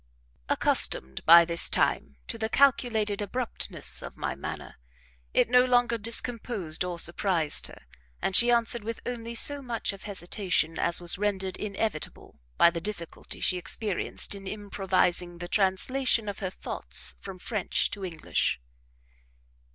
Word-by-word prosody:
Accustomed 65 +1 +2
by 170 +1 +9
this 170 0 +3
time - - 0
to 230 - -5
the 220 0 -2
calculated 225 -6 +2
abruptness 235 +4 -2
of - - -9
my - - -3
manner, - - -8 0.5
it - - +3
no 250 +1 +5
longer 245 -2 +2
discomposed 225 -6 0
or 180 -1 -4
surprised 170 -2 +2
her, - - -14 0.4
and 190 - +1
she 240 +3 +8
answered 235 -1 +2
with 230 +1 -5
only 235 -1 -5
so 285 +4 +3
much 235 -5 -3
of 195 - -12
hesitation 180 -4 -1
as 170 - +1
was 175 +1 +1
rendered 195 -3 -1
inevitable 205 -4 -5 0.2
by 170 - +6
the 170 -1 -5
difficulty 180 -3 -7
she 180 - +1
experienced 200 +2 -2
in 195 -1 -9
improvising 185 -4 -1
the 175 0 -7
translation 215 +5 +1
of 205 - -5
her 190 - -3
thoughts - - -1
from 195 -2 -8
French 205 0 -2
to 200 - -6
English. 165 - -2
200 Hz, 145 wpm, -27 LUFS, 180-230 Hz, 0.5 s, by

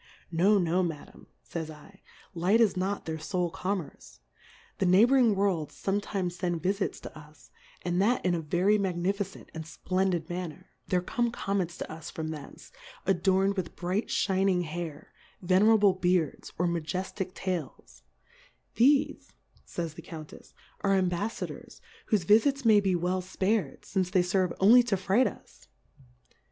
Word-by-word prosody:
No, 190 +5 +4
no, 180 0 +2
Madam, 165 -5 -6 0.2
fays 160 -2 -5
I; 160 +6 -14 0.3
Light 185 +6 +2
is 225 -4 +4
not 190 +2 -2
their 160 -1 -4
fole 175 +1 -2
Commerce; 165 - -5 0.6
the 190 - +2
Nighbouring 230 +4 +5
Worlds 190 -6 0
fometimes 195 -2 -2
fend 175 -3 -2
Vifits 195 +2 -1
to - - -10
us, 150 -4 -15 0.3
and 175 +1 0
that 235 +3 +2
in 180 - +3
a 170 - -1
very 180 +7 +2
magnificent 195 +1 -2
and 160 0 -5
fplendid 175 +2 -1
manner: 180 0 -6 0.2
There 180 -1 +1
come 240 +5 0
Comets 195 -6 -2
to - - -6
us 160 0 -8
from 160 -1 -5
thence, 150 -3 -9 0.3
adorn'd 195 +1 +2
with 185 -3 -4
bright 185 +5 -2
fhin 195 0 +1
ing 180 -2 +2
Hair, 160 -2 -6 0.3
Venerable 200 +2 +4
Beards, 180 -4 0
or 180 - +1
Maje 170 -1 -2
ftick 190 0 -4
Tails; 185 -4 -5 0.7
thefe, 290 +4 +3 0.3
fays 165 -3 -4
the - - -10
Qoiintefs^ 155 -2 -11 0.3
are 195 -1 +2
Embaffadors, 185 +4 -3 0.3
whofe 205 -6 +2
V 210 +5 +7
ifits 275 +1 -1
may 215 -2 +7
be 195 -2 +1
well 180 +2 0
fpared, 190 -3 -1
fince 185 -2 -1
they 185 -1 +3
ferve 180 0 +1
only 225 +6 +8
to 235 -5 0
fright 195 +7 +2
us. - - -11
185 Hz, 150 wpm, -28 LUFS, 170-200 Hz, 0.7 s, only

